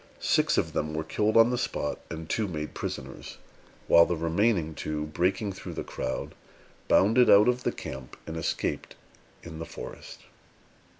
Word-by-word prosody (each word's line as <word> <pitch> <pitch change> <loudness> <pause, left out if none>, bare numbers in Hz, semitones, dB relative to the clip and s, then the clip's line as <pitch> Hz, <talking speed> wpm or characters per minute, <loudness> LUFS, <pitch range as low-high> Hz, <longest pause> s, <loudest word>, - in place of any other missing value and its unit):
Six - - +2
of - - 0
them 75 0 -2
were 80 - -1
killed 105 +7 +1
on 115 +2 +7
the 125 - 0
spot, 75 - -2
and 80 -1 -6
two 110 +4 0
made 75 -4 -5
prisoners; - - -6 0.5
while 85 0 +7
the 90 - 0
remaining 85 +1 +1
two, 75 0 -3
breaking 95 +6 0
through 95 - -8
the - - -3
crowd, 65 - -4 0.5
bounded 115 +5 +5
out 100 +3 +7
of 125 0 +2
the - - 0
camp 65 -1 -8
and 80 - -6
escaped 80 - -2 0.5
in 80 -1 -8
the - - -4
forest. - - -9
85 Hz, 165 wpm, -28 LUFS, 75-105 Hz, 0.5 s, on